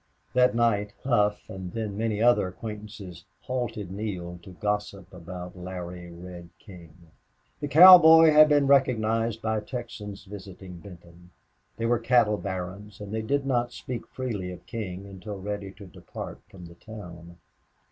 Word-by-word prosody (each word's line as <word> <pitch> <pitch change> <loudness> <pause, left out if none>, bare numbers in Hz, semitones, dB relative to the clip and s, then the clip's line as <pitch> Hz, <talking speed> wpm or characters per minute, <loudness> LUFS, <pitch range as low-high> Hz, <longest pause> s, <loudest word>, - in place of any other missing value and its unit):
That 125 -1 +4
night 105 -3 +1
Hough 105 -5 +1
and 95 -2 -8
then 110 -3 -4
many 110 0 -1
other 120 -5 +4
acquaintances 105 -3 -9 0.2
halted 120 -7 -4
Neale 90 -4 -5
to 90 - -13
gossip 105 +1 -4
about 90 0 -9
Larry 90 -1 -7
Reel 85 0 -10
King. 85 -5 -15 0.5
The 145 - -3
cowboy 160 +1 +9
had 155 0 +7
been 145 -1 +4
recognized 115 -4 +2
by 110 -1 0
Texans 105 -4 -7
visiting 95 -2 -10
Benton. 85 -1 -15 0.5
They 115 - -2
were 120 0 +2
cattle 115 -3 +3
barons 95 +2 -6
and 105 0 -8
they 110 - -1
did 140 +5 -1
not 120 -2 0
speak 125 -2 -6
freely 110 -8 -4
of 90 - -11
King 100 -4 -6
until 100 +1 -8
ready 100 0 -5
to 100 +1 -12
depart 90 - -9
from 95 -4 -12
the 85 - -12
town. 85 -4 -11
105 Hz, 145 wpm, -26 LUFS, 90-115 Hz, 0.5 s, cowboy